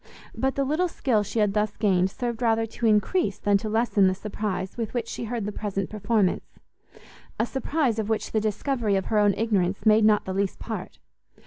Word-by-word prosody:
But 265 0 -1
the 275 - +1
little 310 +7 +1
skill 250 -10 0
she 205 +3 -5
had 210 -2 +2
thus 210 0 -1
gained, 190 -3 +2
served 240 +2 -4
rather 225 -1 +2
to 225 +1 -2
increase 210 - +2
than 205 -1 +2
to 215 - -4
lessen 220 -3 +3
the 185 - +1
surprize 195 -2 -4
with 230 0 -4
which 235 -2 -1
she 235 - -5
heard 230 -2 -3
the 210 - -3
present 195 -2 -3
performance, 210 -2 0 0.8
a 225 - +3
surprize 265 -2 -1
of 215 0 -2
which 220 - -1
the 220 - +1
discovery 220 0 0
of 190 - 0
her 210 - +4
own 205 -1 +3
ignorance 200 -3 0
made 215 0 +5
not 210 -1 +4
the 190 - -3
least 195 0 -1
part. - - -6
215 Hz, 205 wpm, -25 LUFS, 200-230 Hz, 0.8 s, made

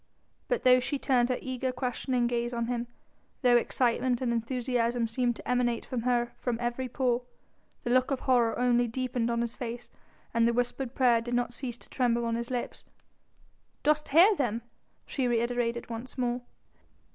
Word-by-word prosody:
But - - 0
though 255 0 +7
she 280 +3 -2
turned 250 -3 +2
her 255 - +1
eager, 260 0 -2
questioning 250 0 -1
gaze 240 0 -1
on 235 0 0
him, 240 0 -2 0.6
though 245 -1 +6
excitement 245 +1 +2
and 245 -2 0
enthusiasm 240 0 0
seemed 240 +1 0
to - - -11
emanate 245 -2 +1
from 250 -3 -3
her 240 0 +1
from 245 -2 -1
every 245 +2 -2
pore, 245 -1 +1 0.6
the 240 - -1
look 255 +1 +3
of 275 -2 -1
horror 240 -3 +2
only 245 -1 +3
deepened 245 0 -1
on 235 0 0
his 235 -1 -3
face 240 -1 -6 0.4
and 230 0 +4
the 235 - +2
whispered 245 +1 -2
prayer 240 -3 +4
did 240 +1 -3
not 245 0 0
cease 245 -1 -5
to - - -16
tremble 235 -2 +1
on 230 - -1
his 235 +1 -3
lips. 250 -2 -4 1.0
"Dost 300 0 +2
hear 360 +9 +7
them?" 235 - -1 0.4
she 260 -3 -1
reiterated 235 0 0
once 235 +4 -7
more. 245 -1 0
245 Hz, 175 wpm, -29 LUFS, 235-255 Hz, 1.0 s, though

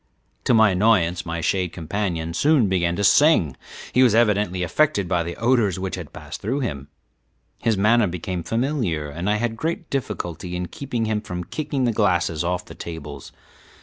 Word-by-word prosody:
To - - +4
my 110 -2 +6
annoyance 90 -3 +2
my 85 0 -3
shade 90 +1 0
companion 85 -1 -3
soon 145 - +3
began 85 -2 +1
to 100 - -2
sing 100 - +4 0.4
he 130 - +4
was 120 -4 +5
evidently 105 -5 +2
affected 100 - +1
by 90 -1 +1
the 85 0 -4
odors 115 -5 +2
which 95 0 -4
had 85 -6 -6
passed 75 +1 -9
through 130 +8 -1
him. 70 - -4 0.7
His 110 -3 +1
manner 110 +2 +4
became 90 +1 -4
familiar, 115 - -1
and 85 +7 -3
I 105 - +3
had 115 +1 -1
great 165 +6 -4
difficulty 90 - -4
in 90 -1 -4
keeping 120 0 -3
him 110 -1 -1
from 90 -2 -5
kicking 145 - -3
the 120 - +2
glasses 90 -6 +1
off 90 +1 -2
the - - -11
tables. 75 -4 -8
95 Hz, 180 wpm, -23 LUFS, 85-115 Hz, 0.7 s, my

